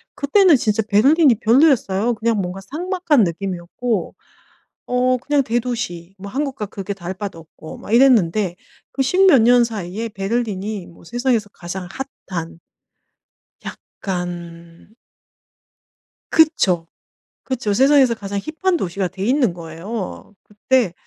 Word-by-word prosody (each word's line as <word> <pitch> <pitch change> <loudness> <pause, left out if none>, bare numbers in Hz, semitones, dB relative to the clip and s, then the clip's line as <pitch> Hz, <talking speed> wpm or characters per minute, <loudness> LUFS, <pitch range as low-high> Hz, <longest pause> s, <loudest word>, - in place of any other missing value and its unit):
그때는 345 +4 +4
진짜 220 -3 +1
베를린이 270 +6 +5
별로였어요. 235 -4 +3
그냥 225 0 0
뭔가 180 +1 -5
삭막한 325 - 0
느낌이었고 185 +4 -3 0.7
어 250 +1 +2
그냥 290 +3 +1
대도시 225 -8 -3
뭐 200 +1 -8
한국과 265 -3 -3
그렇게 200 0 -6
다를 185 -1 -6
바도 195 -2 -6
없고 160 -1 -12
막 - - -8
이랬는데 215 -7 +4 0.4
그 270 - 0
10 365 +9 +3
몇 280 -11 +6
년 245 +1 +5
사이에 215 0 -5
베를린이 205 -2 -3
뭐 170 - -17
세상에서 240 +1 -1
가장 180 0 -7 0.4
핫한 165 -3 -5 1.1
약간 - - -11 2.2
그쵸, 195 - +3 0.6
그쵸. 255 -5 -2
세상에서 265 +1 +4
가장 200 -2 -5
힙한 345 - -1
도시가 190 - -2
돼 190 +2 -6
있는 250 -3 +2
거예요. 180 +6 -7
그때 210 -1 0
220 Hz, 270 characters per minute, -20 LUFS, 190-260 Hz, 2.2 s, 몇